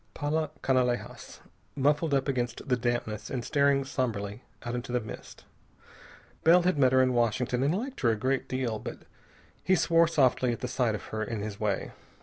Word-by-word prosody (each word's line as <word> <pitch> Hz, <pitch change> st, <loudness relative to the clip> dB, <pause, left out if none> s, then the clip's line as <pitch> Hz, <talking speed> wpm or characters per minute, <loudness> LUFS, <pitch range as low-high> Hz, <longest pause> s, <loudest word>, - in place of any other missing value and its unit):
Paula 155 Hz, +1 st, -1 dB
Canalejas, 125 Hz, -2 st, -1 dB, 0.3 s
muffled 145 Hz, +2 st, +2 dB
up 135 Hz, 0 st, 0 dB
against 125 Hz, -3 st, -2 dB
the 125 Hz, -, +3 dB
dampness 120 Hz, -3 st, -2 dB
and 125 Hz, -3 st, -3 dB
staring 140 Hz, -2 st, +2 dB
somberly 110 Hz, -6 st, -3 dB, 0.2 s
out 120 Hz, -, -3 dB
into 120 Hz, 0 st, -4 dB
the 125 Hz, -, +1 dB
mist. 110 Hz, -2 st, -10 dB, 1.0 s
Bell 175 Hz, +2 st, +6 dB
had 180 Hz, -4 st, +1 dB
met 130 Hz, -2 st, +5 dB
her 130 Hz, 0 st, +5 dB
in 130 Hz, 0 st, +1 dB
Washington 120 Hz, +1 st, +1 dB
and 145 Hz, +7 st, +2 dB
liked 260 Hz, +5 st, -5 dB
her 120 Hz, -, +3 dB
a 110 Hz, -, +2 dB
great 130 Hz, +5 st, -1 dB
deal, 125 Hz, -4 st, -2 dB
but -, -, -8 dB, 0.6 s
he 185 Hz, -, +3 dB
swore 165 Hz, -1 st, +4 dB
softly 130 Hz, -5 st, +2 dB
at 125 Hz, +2 st, -4 dB
sight 125 Hz, -3 st, 0 dB
of 100 Hz, -, -7 dB
her 110 Hz, 0 st, -1 dB
in 110 Hz, 0 st, -4 dB
his 105 Hz, -1 st, -5 dB
way. 105 Hz, -3 st, -1 dB
130 Hz, 180 wpm, -28 LUFS, 120-140 Hz, 1.0 s, Bell